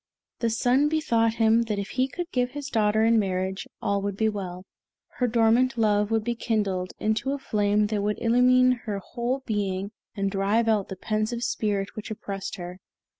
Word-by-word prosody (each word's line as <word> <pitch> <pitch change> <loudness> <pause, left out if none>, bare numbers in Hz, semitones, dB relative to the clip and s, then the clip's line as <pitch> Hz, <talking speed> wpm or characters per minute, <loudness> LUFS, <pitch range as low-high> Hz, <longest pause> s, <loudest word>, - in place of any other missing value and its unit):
The 230 - +1
Sun 250 +6 +2
bethought 230 -8 +1
him 225 0 +4
that 215 -2 -2
if 200 0 -4
he 255 +1 0
could 345 +6 -6
give 250 0 0
his 290 -1 -5
daughter 220 -1 +2
in 230 0 +4
marriage, 190 -1 -2 0.2
all 200 -1 +1
would 200 -1 -3
be 220 0 +2
well; 185 -3 -6 0.5
her 250 - +2
dormant 235 +2 +3
love 210 -2 +2
would 225 -1 +1
be 240 +2 -1
kindled 205 -6 -1
into 220 +6 0
a - - -2
flame 210 -5 +1
that 210 -1 -1
would 210 +1 -1
illumine 250 +2 +4
her 210 -3 -2
whole 240 +6 -3
being 200 -2 -2 0.2
and 195 -1 -1
drive 205 +4 +1
out 215 -3 +2
the 190 - -5
pensive 215 +5 -2
spirit 205 -4 -1
which 215 +1 -7
oppressed 200 -3 -5
her. 180 0 -8
220 Hz, 185 wpm, -26 LUFS, 200-235 Hz, 0.5 s, him